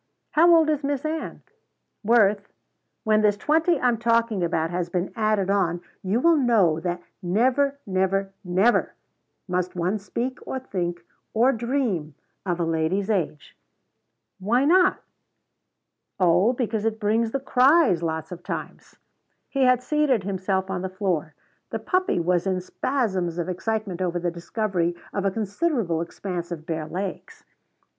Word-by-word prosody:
"How 335 Hz, +3 st, +5 dB
old 325 Hz, -1 st, +4 dB
is 300 Hz, -1 st, -1 dB
Miss 280 Hz, 0 st, -2 dB
Ann?" 315 Hz, +1 st, -4 dB, 0.6 s
"Worth, 205 Hz, -2 st, +3 dB, 0.5 s
when 215 Hz, 0 st, +3 dB
this 205 Hz, -1 st, +3 dB
twenty 320 Hz, -, +2 dB
I'm 245 Hz, -3 st, +1 dB
talking 230 Hz, -4 st, +1 dB
about 165 Hz, -1 st, 0 dB
has 175 Hz, 0 st, -2 dB
been 180 Hz, +1 st, -2 dB
added 215 Hz, -4 st, +1 dB
on, 180 Hz, -4 st, +1 dB, 0.2 s
you 195 Hz, +5 st, 0 dB
will 335 Hz, +4 st, +4 dB
know 215 Hz, -, +3 dB
that 175 Hz, +1 st, -3 dB, 0.2 s
never, 255 Hz, +9 st, +1 dB
never, 195 Hz, 0 st, 0 dB
never 190 Hz, +6 st, +2 dB, 0.5 s
must 180 Hz, 0 st, -2 dB
one 180 Hz, +4 st, -1 dB
speak 240 Hz, +6 st, -4 dB
or -, -, -3 dB
think 175 Hz, -9 st, -3 dB, 0.3 s
or 240 Hz, +4 st, +5 dB
dream 235 Hz, -, -2 dB, 0.3 s
of 175 Hz, -1 st, -1 dB
a -, -, +1 dB
lady's 165 Hz, +6 st, 0 dB
age." 165 Hz, -7 st, -2 dB, 0.8 s
"Why 235 Hz, +8 st, +2 dB
not?" 365 Hz, +4 st, +4 dB, 1.2 s
"Oh, 185 Hz, +6 st, +4 dB
because 225 Hz, -4 st, -2 dB
it 220 Hz, 0 st, -1 dB
brings 220 Hz, +1 st, +1 dB
the 275 Hz, -, -2 dB
cries 265 Hz, -, +4 dB
lots 160 Hz, -1 st, -3 dB
of 180 Hz, -1 st, -7 dB
times." -, -, -7 dB, 0.5 s
He 270 Hz, -1 st, +2 dB
had 250 Hz, -1 st, +3 dB
seated 290 Hz, -7 st, +1 dB
himself 190 Hz, 0 st, -2 dB
on 180 Hz, -2 st, -2 dB
the 190 Hz, -, -3 dB
floor. 185 Hz, -5 st, -2 dB, 0.3 s
The -, -, -3 dB
puppy 370 Hz, -, 0 dB
was 175 Hz, +2 st, +1 dB
in 185 Hz, -1 st, 0 dB
spasms 185 Hz, -4 st, -2 dB
of 175 Hz, -, -2 dB
excitement 200 Hz, -1 st, -3 dB
over 175 Hz, -1 st, 0 dB
the 175 Hz, 0 st, -1 dB
discovery 175 Hz, 0 st, -2 dB, 0.2 s
of 200 Hz, -1 st, -2 dB
a -, -, +4 dB
considerable 210 Hz, -, -1 dB
expanse 175 Hz, 0 st, -5 dB
of 160 Hz, -2 st, -6 dB
bare 160 Hz, -2 st, -3 dB
legs. 185 Hz, +3 st, -6 dB
200 Hz, 150 wpm, -24 LUFS, 175-240 Hz, 1.2 s, How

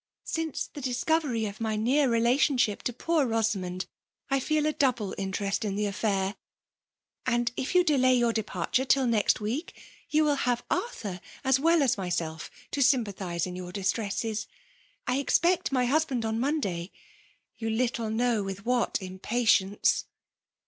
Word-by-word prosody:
Since 325 Hz, -3 st, -2 dB
the 290 Hz, -, -7 dB
disco 260 Hz, +5 st, +1 dB
very 240 Hz, -8 st, -2 dB
of 205 Hz, +2 st, -6 dB
my 220 Hz, -1 st, 0 dB
near 260 Hz, +6 st, +2 dB
relationship 240 Hz, -1 st, +2 dB
to -, -, +1 dB
poor 315 Hz, +5 st, +1 dB
Bosa* 225 Hz, -2 st, +1 dB
mond, 185 Hz, 0 st, -4 dB, 0.5 s
I 275 Hz, -, +3 dB
feel 305 Hz, +3 st, +1 dB
a 305 Hz, -, +1 dB
double 245 Hz, -9 st, +1 dB
interest 195 Hz, +1 st, -2 dB
in 200 Hz, -2 st, -2 dB
the 210 Hz, +1 st, 0 dB
affair; 200 Hz, -1 st, -1 dB, 0.9 s
and 240 Hz, -1 st, +1 dB
if 265 Hz, +7 st, -3 dB
you 360 Hz, -, +6 dB
delay 260 Hz, -6 st, +4 dB
your 240 Hz, -2 st, +2 dB
departure 215 Hz, +2 st, -1 dB
till 270 Hz, 0 st, +3 dB
next 225 Hz, -4 st, +2 dB
week, 240 Hz, +11 st, -4 dB, 0.3 s
you 310 Hz, +1 st, +3 dB
will 295 Hz, -2 st, +2 dB
have 245 Hz, -2 st, 0 dB
Arthur 205 Hz, -, -3 dB, 0.2 s
as 265 Hz, -1 st, +3 dB
well 330 Hz, +1 st, +4 dB
as 245 Hz, -6 st, +1 dB
myself 170 Hz, -3 st, -3 dB, 0.2 s
to 285 Hz, -, -1 dB
sympathize 205 Hz, -, +1 dB
in 180 Hz, -1 st, -6 dB
your 180 Hz, -1 st, -6 dB
distresses. 210 Hz, +2 st, -2 dB, 0.6 s
I 250 Hz, +1 st, +1 dB
expect 345 Hz, +6 st, +2 dB
my 255 Hz, -2 st, +2 dB
husband 270 Hz, -3 st, +1 dB
on 220 Hz, 0 st, -1 dB
Monday; 200 Hz, -, -1 dB, 0.4 s
— -, -, -37 dB
you 225 Hz, -1 st, -2 dB
little 230 Hz, 0 st, 0 dB
know 230 Hz, 0 st, +1 dB
with 195 Hz, +1 st, -6 dB
what 245 Hz, 0 st, +1 dB
impatience 195 Hz, +1 st, +1 dB
235 Hz, 160 wpm, -28 LUFS, 200-270 Hz, 0.9 s, you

